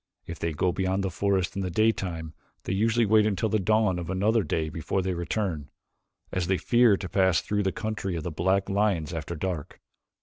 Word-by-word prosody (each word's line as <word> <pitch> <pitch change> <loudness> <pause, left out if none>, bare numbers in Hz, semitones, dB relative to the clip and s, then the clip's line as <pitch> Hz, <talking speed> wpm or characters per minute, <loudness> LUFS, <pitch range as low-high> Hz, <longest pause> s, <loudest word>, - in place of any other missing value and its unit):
If 85 - -7
they 85 - -1
go 90 +4 0
beyond 95 +1 -1
the 95 - -1
forest 95 0 0
in 100 - -2
the 95 - -2
daytime 90 -5 0 0.3
they - - -2
usually 115 +4 +2
wait 110 0 +4
until 110 +2 0
the 110 - +1
dawn 105 -2 +2
of 85 -1 -6
another 105 +5 +2
day 80 -5 -1
before 80 +5 -2
they 95 0 -1
return, 85 -3 -3 0.6
as 90 -2 -1
they 95 0 +2
fear 120 -2 +4
to 95 - -5
pass 95 -3 +3
through 105 0 -1
the 95 -1 0
country 110 -4 -3
of 80 - -4
the 85 - -4
black 95 +5 +1
lions 100 -6 0
after 80 +1 -4
dark. 85 -2 -4
95 Hz, 205 wpm, -27 LUFS, 85-105 Hz, 0.6 s, wait